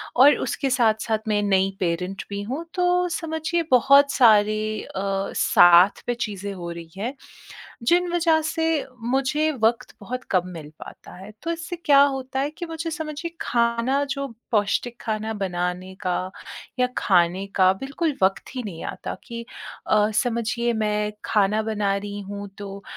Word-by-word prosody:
और 275 +4 +7
उसके 275 - -1
साथ-साथ 220 -2 +1
मैं 210 -1 +1
नई 195 -1 +2
पेरेंट 180 +2 -2
भी 200 0 -4
हूँ। 265 +10 -4
तो 360 0 +2
समझिए 325 0 -2
बहुत 275 +3 +6
सारी 215 -2 +3
अ, - - -12 0.4
साथ 175 +3 +6
पे 245 - +1
चीज़ें 200 -1 -6
हो 175 -2 -6
रही 170 -1 -9
हैं, 230 +7 -3 0.7
जिन 350 +8 +3
वजह 330 -2 +3
से 325 0 0 0.5
मुझे 295 +4 +1
वक़्त 235 +3 +1
बहुत 255 +1 -5
कम 180 -2 +2
मिल 155 -3 -9
पाता - - -12
है। 195 +3 -10
तो 335 - -1
इससे 335 +1 -5
क्या 280 -1 +7
होता 265 -1 0
है 280 +2 0
कि 350 - -4
मुझे 330 0 -5
समझिए 320 +1 -5
खाना, 235 +3 +1
जो 275 0 -3 0.2
पौष्टिक 215 +2 +1
खाना 220 0 -3
बनाने 180 -2 -3
का, 185 -1 -2 0.5
या 250 - +4
खाने 180 0 +2
का 185 -1 +5
बिल्कुल 285 +3 -2
वक़्त 195 +7 0
ही 255 - -2
नहीं 180 -7 -7
आता - - -5
कि 235 0 -7 0.4
अ, 210 0 +3
समझिए, 235 0 0
मैं 210 -1 0
खाना 210 0 +2
बना 210 -2 0
रही 205 0 -6
हूँ, 200 +1 -7
तो 200 -1 -8
225 Hz, 155 wpm, -23 LUFS, 200-280 Hz, 0.7 s, और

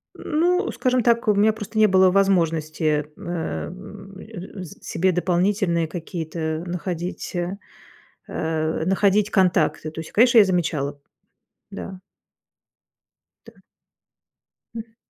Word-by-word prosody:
Ну, 355 +5 0
скажем 255 -2 +1
так, 235 0 +2
у 210 - +5
меня 210 +2 +3
просто 215 0 -7
не 215 0 +6
было 190 -1 +5
возможности, 160 -5 +1
э, 170 -2 -4 0.5
э, 195 -2 -9
с 170 - -11
себе 185 +2 +1
дополнительные 180 -1 +1
какие-то 160 -1 -4
находить, 175 0 -4 0.9
э, 160 0 -2
находить 200 +2 +2
контакты. 180 -5 +2
То 160 - -8
есть, 160 - -8
конечно, 235 +2 +5
я 210 - +9
замечала, 155 -6 -1 0.7
да. 190 -1 -7 1.5
Да. - - -15 1.2
М. 225 0 -8
185 Hz, 105 wpm, -23 LUFS, 160-210 Hz, 1.5 s, я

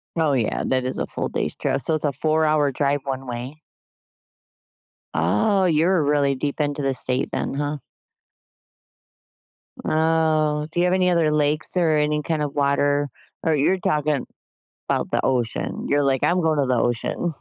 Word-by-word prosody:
Oh, 160 -4 +2
yeah. 120 -5 0
That 130 -1 0
is 130 - -2
a - - -1
full - - -3
day's - - -2
trip. - - -1
So 160 - +1
it's 155 - -2
a 145 - +1
4 155 +3 +1
hour 150 -2 +2
drive 140 +1 0
one 135 -1 -4
way? 125 +5 -6 1.5
Oh, 105 - +2
you're 165 +1 +2
really 145 -1 +2
deep 140 +3 -3
into 145 -1 -1
the 135 -1 0
state 130 0 0
then, - - -2
huh? 145 +1 -2 2.1
Oh, 155 -1 +1
do 175 - -2
you 175 - +3
have 180 - +2
any 185 -1 +2
other 165 -3 +2
lakes 150 +3 +1
or 160 -3 +3
any 150 0 +1
kind 160 0 -1
of 145 -1 -3
water? 145 0 +1 0.3
Or 160 -1 +2
you're 150 +7 +2
talking 150 -5 0 0.6
'bout - - -1
the - - +1
ocean. 120 -4 -1
You're 145 0 +2
like, 135 -2 +1
"I'm 180 +1 +2
going 155 -3 +1
to 140 - +2
the 125 -1 +1
ocean." 120 +8 -1
150 Hz, 170 wpm, -22 LUFS, 135-160 Hz, 2.1 s, you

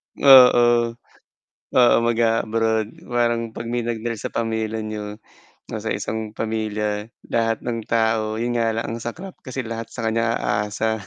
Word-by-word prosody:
Oo. 120 -3 +6 0.8
Oo, 120 -2 +6
mag-aabroad, 115 -1 +1 0.2
parang 120 -1 0
pag 115 +1 -7
may 120 0 -1
nag-rest 115 -1 -4
sa - - -4
pamilya 110 -1 -2
niyo, 105 0 -6 0.5
nasa - - -2
isang 110 -1 -4
pamilya 105 -1 -2 0.2
lahat 115 -1 0
ng 115 -2 -4
tao 110 -1 +1
yun 120 +2 -2
nga 115 -1 +1
lang 115 - -1
ang 115 +1 -5
saklap 170 +12 -7
kasi 130 -1 -5
lahat 115 0 -5
sa 115 0 -7
kanya 115 +1 +1
aasa. 105 +1 -1
115 Hz, 140 wpm, -22 LUFS, 110-120 Hz, 0.8 s, Oo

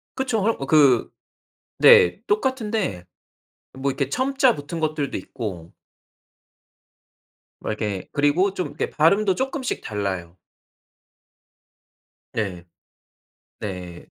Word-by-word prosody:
그쵸. 250 -5 -1
헐 225 +3 +2
어 135 - -3
그 140 -5 +5 0.7
네. 90 - +6
똑같은데 215 - -1 0.7
뭐 135 +1 -2
이렇게 135 0 -2
첨자 265 - +2
붙은 155 +3 -6
것들도 155 -3 -1
있고 95 -10 -7 1.9
뭐 - - -3
이렇게 105 -3 -3
그리고 155 +7 +2
좀 180 -4 -2
이렇게 145 +1 -4
발음도 190 +5 +3
쪼끔씩 265 0 -3
달라요. 95 -4 -4 2.0
네. 95 -5 -3 1.0
네. 90 -4 -7
145 Hz, 190 characters per minute, -23 LUFS, -, 2.0 s, 네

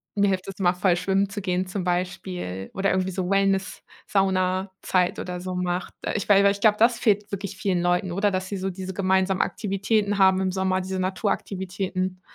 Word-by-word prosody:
Mir 200 -1 +3
hilft 185 -1 -1
das 195 - -6
immer 180 -2 +2
voll 180 0 +2
schwimmen 195 +2 +1
zu 205 +1 -5
gehen, 185 0 -1
zum 185 0 -3
Beispiel, 180 - -3
oder 195 0 0
irgendwie 185 0 0
so 180 -1 -3
Wellness, 195 -1 +1 0.2
Saunazeit 185 -1 0
oder 180 -1 -4
so 185 +1 -5
macht. 180 0 -2
Da - - -3
ich 205 - -2
weil 200 -1 +6
weil, 200 - +5
ich 200 - -9
glaube, 210 -1 +5
das 230 +1 +4
fehlt 210 -3 +1
wirklich 200 0 -4
vielen 185 -3 0
Leuten, 175 +1 +1
oder? 200 +3 +1
Dass 185 0 -2
sie 200 - -3
so 190 +1 -2
diese 190 +1 -6
gemeinsamen 190 0 +2
Aktivitäten 205 0 0
haben 190 -1 +5
im 190 -1 0
Sommer, 190 0 0
diese 190 0 -4
Naturaktivitäten. 185 -1 -2
190 Hz, 200 wpm, -25 LUFS, 185-195 Hz, 0.2 s, weil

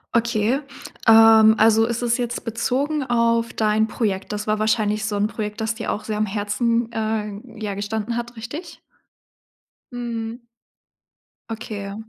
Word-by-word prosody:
Okay, 230 +2 +2 0.5
ähm, 220 -1 +8
also, 225 +1 +5
es 235 +1 -2
ist 235 +1 +1
jetzt 240 0 -3
bezogen 265 +6 -1
auf 230 -2 +1
dein 215 0 +2
Projekt. 205 -4 -2
Das 210 0 -4
war 215 0 0
wahrscheinlich 215 -1 +1
so 210 -1 -2
'n 205 0 +1
Projekt, 210 0 -4
dass 220 0 -1
dir 225 0 -3
auch 210 - -4
sehr 215 0 -3
am 215 - +1
Herzen, 225 +3 0
äh, 215 -2 -3 0.2
ja 210 -2 -3
gestanden 210 +3 -3
hat 240 0 -5
richtig? 290 +10 -8 1.1
Mhm. 235 -1 -5 1.1
Okay. 210 -3 -6
220 Hz, 145 wpm, -22 LUFS, 215-235 Hz, 1.1 s, ähm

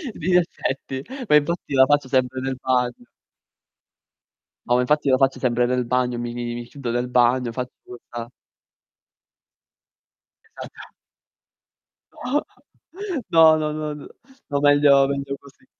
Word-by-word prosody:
Di 165 - -6
in 180 - +5
effetti. 135 -5 -3 0.3
Ma 150 - +6
infatti 150 +1 0
la 130 -1 +6
faccio 145 -1 +1
sempre 130 0 0
nel 135 0 -3
bagno. 125 -1 -1 1.6
No, 120 - +3
ma 125 - +3
infatti 150 +3 +1
la 130 - +5
faccio 135 0 +1
sempre 125 -1 +1
nel 125 0 0
bagno, 125 0 0
mi 120 0 -4
mi 120 0 -5
mi 120 - -4
mi 120 0 -6
chiudo 125 -1 -6
nel 120 +1 -1
bagno, 125 -1 +2
faccio 125 +1 -5
questa 120 -1 -9 2.2
Esatto. 445 - -12 2.4
No, 160 -1 +7
no, 150 -1 -2
no, 150 -1 -4
no 150 - -11
n - - -11 0.4
no, 140 -1 0
meglio 145 -1 +5
meglio 140 0 -3
così. 140 -1 -20
130 Hz, 140 wpm, -22 LUFS, 125-145 Hz, 2.4 s, No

